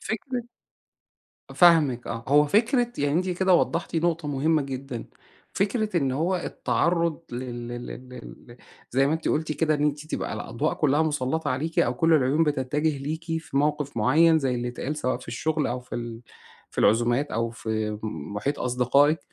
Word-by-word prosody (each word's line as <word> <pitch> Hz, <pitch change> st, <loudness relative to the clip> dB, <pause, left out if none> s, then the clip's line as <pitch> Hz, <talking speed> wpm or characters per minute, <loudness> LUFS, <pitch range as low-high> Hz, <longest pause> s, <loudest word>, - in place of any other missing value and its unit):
فكرة 245 Hz, +3 st, -4 dB, 1.1 s
فاهمِك، 155 Hz, -9 st, +4 dB
آه. 115 Hz, 0 st, -5 dB
هو 145 Hz, +2 st, +6 dB
فكرة 240 Hz, -, +2 dB
يعني 145 Hz, 0 st, +1 dB
أنتِ 185 Hz, +3 st, +1 dB
كده 185 Hz, +1 st, +2 dB
وضَّحتِ 170 Hz, 0 st, 0 dB
نُقطة 165 Hz, -1 st, 0 dB
مُهمَّة 150 Hz, +2 st, +1 dB
جدًا. 135 Hz, -3 st, -6 dB, 0.5 s
فكرة 210 Hz, 0 st, 0 dB
إن 135 Hz, -5 st, +1 dB
هو 170 Hz, +7 st, 0 dB
التعرُّض 170 Hz, -1 st, 0 dB
لل 120 Hz, -1 st, -5 dB
لل 120 Hz, 0 st, -6 dB
لل 125 Hz, 0 st, -9 dB, 0.2 s
ل 120 Hz, -, -13 dB, 0.3 s
زي 135 Hz, +2 st, +3 dB
ما 150 Hz, -, +1 dB
أنتِ 160 Hz, -, -1 dB
قُلتِ 155 Hz, 0 st, 0 dB
كده، 155 Hz, 0 st, +1 dB
إن 150 Hz, -, 0 dB
أنتِ 150 Hz, +1 st, -1 dB
تبقى -, -, -3 dB
الأضواء 115 Hz, +7 st, -2 dB
كُلَّها 150 Hz, 0 st, +2 dB
مُسلَّطَة 150 Hz, 0 st, -1 dB
عليكِ 155 Hz, +6 st, -2 dB
أو 120 Hz, -, +3 dB
كل 165 Hz, +6 st, +2 dB
العيون 145 Hz, +1 st, +3 dB
بتتَّجه 150 Hz, +1 st, 0 dB
ليكِ 155 Hz, +4 st, -4 dB
في 165 Hz, -4 st, -4 dB
موقف 145 Hz, -1 st, 0 dB
معيَّن، 160 Hz, +8 st, +4 dB
زي 135 Hz, -4 st, 0 dB
اللي 120 Hz, 0 st, -2 dB
اتقال، 135 Hz, +5 st, -4 dB
سواء 130 Hz, -3 st, -1 dB
في -, -, -14 dB
الشغل 155 Hz, +6 st, -1 dB
أو 125 Hz, +1 st, -3 dB
في 125 Hz, -, -10 dB
ال 115 Hz, -1 st, -5 dB, 0.5 s
في -, -, -12 dB
العزومات 120 Hz, +6 st, +3 dB
أو 115 Hz, +1 st, -1 dB
في 110 Hz, -2 st, -3 dB
محيط 105 Hz, -, -3 dB
أصدقائك. 125 Hz, +5 st, +3 dB
145 Hz, 170 wpm, -25 LUFS, 125-160 Hz, 1.1 s, هو